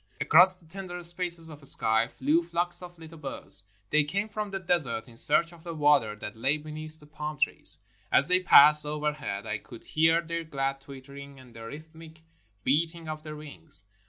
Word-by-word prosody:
Across 180 +4 +6
the 180 -2 -24
tender 180 +1 -8
spaces 170 -1 +3
of 150 -1 -13
sky 110 -3 +4
flew 145 +7 0
flocks 175 +1 -1
of 175 -1 -11
Uttle 165 -1 -13
birds. 130 -8 -2 0.3
They 155 0 +4
came 200 +8 -3
from 210 -1 -5
the 195 - -4
desert 165 -11 -2
in 120 - -16
search 155 +7 +2
of 165 -1 -17
the 170 -1 -7
water 145 -8 +2
that 105 0 -8
lay 135 +7 0
beneath 155 +1 -2
the 150 - -13
palm 150 0 -7
trees. - - -1 0.3
As 140 - +3
they 180 +1 +3
passed 150 -4 +7
overhead 150 -9 -4
I 110 -1 -4
could 115 - -14
hear 160 +2 +2
their 165 0 -5
glad 135 -3 -3
twittering 140 0 -12
and 125 -2 -17
the 115 0 -10
rhythmic 160 +3 -13 0.4
beating 165 +4 -1
of 155 0 -6
their 155 0 -9
wings. 100 - -2
155 Hz, 190 wpm, -27 LUFS, 140-170 Hz, 0.4 s, passed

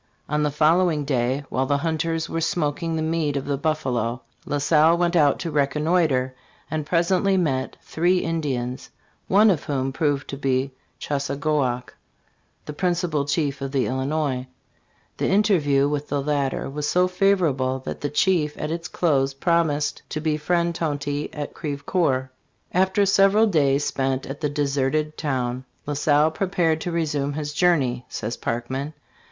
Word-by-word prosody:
"* - - -37
On 150 - +2
the 150 - +2
follow 160 +5 +3
ing 150 -3 -2
day, 130 +1 0
while 130 +1 0
the 140 - +2
hunters 165 +1 -1
were 165 - -3
smoking 165 0 -1
the 160 - -1
meat 160 -3 0
of 135 - -3
the 140 - 0
buffalo, 130 -6 -1 0.2
La 145 - 0
Salle 155 +3 +4
went 175 0 +1
out 145 -4 +4
to 170 - -4
reconnoiter, 145 -2 +1 0.4
.and 155 -2 -2
presently 185 +4 +2
met 135 -7 -1
three 175 +3 +1
Indians, 140 -8 -2 0.4
one 205 +2 +5
of 165 - -2
whom 135 -2 -1
proved 145 -2 0
to 140 - -5
be 135 0 0 0.3
Chassagoac, 140 -3 -1 0.7
the 150 - -6
principal 175 -3 0
chief 145 -1 -1
of 135 -1 -3
the 135 -2 +1
Illinois. 130 0 -1 0.7
The - - 0
interview 165 -9 +3
(with 145 0 -2
the 145 - 0
latter) 140 -2 -1
was 145 +2 -3
so 180 +1 +3
favorable 175 -9 +1
that - - -5
the 145 - -1
chief 150 0 +1
at 150 - -3
its 165 0 -4
close 135 -5 +1
promised 150 -1 +1
to 155 - -3
be 155 0 0
friend 170 +2 0
Tonty 145 -2 -2
at 150 -1 -6
Crevecoeur 140 -3 -1 0.4
"After 190 +2 +3
several 195 +2 +5
days 145 -7 +2
spent 135 -1 -1
at 135 +3 -7
the 150 - 0
deserted 145 +1 0
town, 130 -4 -2 0.2
La 145 - -2
Salle 150 +2 +3
prepared 165 -2 0
to 175 - -3
resume 150 -4 -1
his 150 0 -4
journey," 140 -8 +2
says 115 +2 -4
Parkman. 130 +6 -3
150 Hz, 160 wpm, -23 LUFS, 135-165 Hz, 0.7 s, one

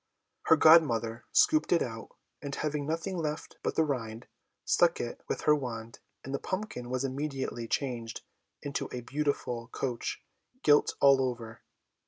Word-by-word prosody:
Her 160 - +8
godmother 120 -8 +5
scooped 310 0 +4
it 175 - +4
out; 115 -2 -7 0.3
and, 140 -1 -4
having 150 -1 -2
left 165 +1 -2
nothing 165 -6 -4
but - - -2
the 160 - +4
rind, 115 -5 -3 0.4
struck - - +3
it - - -5
with - - -2
her 150 - +5
wand, 115 -5 -6 0.2
and 135 - -6
the 140 - -1
pumpkin 185 - -4
was 130 +1 -1
immediately 135 -3 -3
changed 120 -3 -3 0.4
into 140 -1 -3
a 125 - -4
beautiful 125 -3 -2
coach 125 -1 -4 0.4
gilt 145 -1 +4
all 140 -1 +6
over. 120 -3 -4
135 Hz, 150 wpm, -30 LUFS, 120-150 Hz, 0.4 s, Her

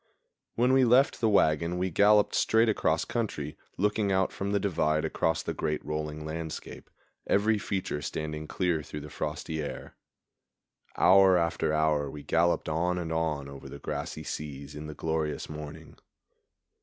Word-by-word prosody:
When 125 +2 +3
we 130 0 +5
left 125 +3 +4
the 110 - +3
wagon 85 -3 +2
we 90 +1 -1
galloped 105 +3 +4
straight 115 +1 +3
across 105 - +1
country, 75 -11 -3 0.2
looking 105 +1 +1
out 95 0 +2
from 100 +1 -3
the 100 - +2
divide 75 -6 +1
across 80 - 0
the - - -3
great 75 -1 -2
rolling 75 0 -4
landscape, 80 0 -6 0.4
every 105 +2 +3
feature 95 -7 -3
standing 75 +2 -4
clear 85 -3 0
through 75 +1 -7
the 75 0 -10
frosty 80 -1 -4
air. 75 - -7 1.0
Hour 95 0 +6
after 85 -2 0
hour 75 -2 +1
we 75 +1 -9
galloped 85 +3 +1
on 85 +3 0
and 80 -2 -3
on 80 -4 -1
over 70 0 -10
the - - -8
grassy - - -5
seas 70 -1 -6
in 75 +1 -7
the 75 - -7
glorious 80 0 -2
morning. 75 +1 -9
80 Hz, 155 wpm, -29 LUFS, 75-100 Hz, 1.0 s, Hour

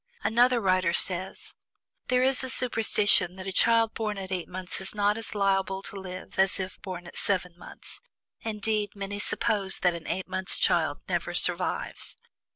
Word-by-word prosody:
Another 245 +2 +4
writer 185 -4 +2
says: 185 +1 0 0.5
"There 250 0 +2
is 265 0 +5
a 260 - -2
superstition 210 -7 +2
that 190 0 -8
a 195 - -3
child 230 +3 +3
born 215 -2 -3
at 190 -1 -6
eight 180 -2 -2
months 185 +1 -5
is 190 - -2
not 205 0 +2
as 225 -1 -5
liable 195 -1 0
to - - -7
live 185 -1 -8
as 190 0 +3
if 185 -1 -6
born 180 -2 -7
at 175 - -11
seven 180 -3 -1
months; 175 - -11 0.4
indeed, 215 -1 -2
many 200 0 -4
suppose 210 -3 0
that 180 -1 +3
an 170 -1 -8
eight 190 - -2
months' 190 0 +2
child - - +1
never - - -2
survives. - - -1
195 Hz, 170 wpm, -27 LUFS, 185-220 Hz, 0.5 s, is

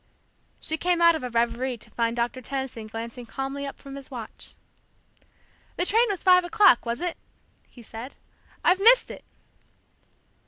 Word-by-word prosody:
She 315 - -1
came 355 +2 +1
out 335 0 +6
of 320 - -3
a 250 - -4
reverie 235 +2 -1
to - - -11
find 230 0 -1
Doctor 240 +2 -2
Tenison 265 -3 -5
glancing 230 +2 -7
calmly 270 +3 -4
up 275 - -8
from 275 -1 -11
his 275 -1 -10
watch. 240 -5 -9 1.2
"The 355 - 0
train 455 +5 +4
was 395 -3 -3
five 365 -1 +6
o'clock, 360 - +4
was 235 +6 -2
it?" 355 -1 -3 0.5
he 240 - -15
said. 230 +5 -9 0.5
"I've 365 +2 +4
missed 475 +5 +6
it!" - - -10
270 Hz, 160 wpm, -25 LUFS, 235-350 Hz, 1.2 s, out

